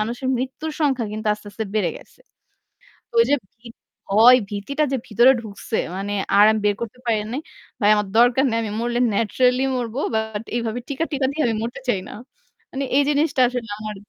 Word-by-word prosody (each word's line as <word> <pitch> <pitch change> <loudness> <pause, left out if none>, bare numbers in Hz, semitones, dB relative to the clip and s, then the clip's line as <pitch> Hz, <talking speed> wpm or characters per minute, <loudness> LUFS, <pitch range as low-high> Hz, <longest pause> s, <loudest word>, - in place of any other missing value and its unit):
মানুষের 240 +4 -3
মৃত্যুর 265 +5 -4
সংখ্যা 265 -6 +1
কিন্তু 215 +1 -5
আস্তে, 210 0 -16
আস্তে, 220 +2 -4
বেড়ে 215 - +1
গেছে। - - -17 1.0
ঐ - - +1
যে 290 - +5 0.2
ভী 235 +1 -15 0.4
ভয়-ভীতিটা 225 +5 +4
যে 270 - +1
ভিতরে 240 +4 +5
ঢুকছে। 215 0 -5 0.2
মানে 200 +1 -3 0.2
আর 205 - +8
আমি 220 - 0
বের 205 - +2
করতে 235 +2 -6
পারি 225 -2 +2 0.2
নাই। 280 - -3 0.4
ভাই 205 - +4
আমার 210 -1 -1
দরকার 245 +3 +5
নাই। 225 - 0
আমি 210 - -4
মরলে 240 +1 -1
ন্যাচারালি 250 +5 +2
মরব। 240 -2 -3 0.2
বাট 220 -1 -2
এইভাবে 235 0 -2
টিকা 285 +4 -1
টিকা, 275 -2 0
দিয়ে 305 +1 -1
আমি 225 - 0
মরতে 245 +4 -5
চাই 200 -6 +1
না। - - -9 0.6
মানে 275 +1 -3
এই 285 - +5
জিনিসটা 290 -2 +1
আসলে 245 -3 -5
আমার 215 -1 -6
235 Hz, 185 wpm, -22 LUFS, 215-265 Hz, 1.0 s, আর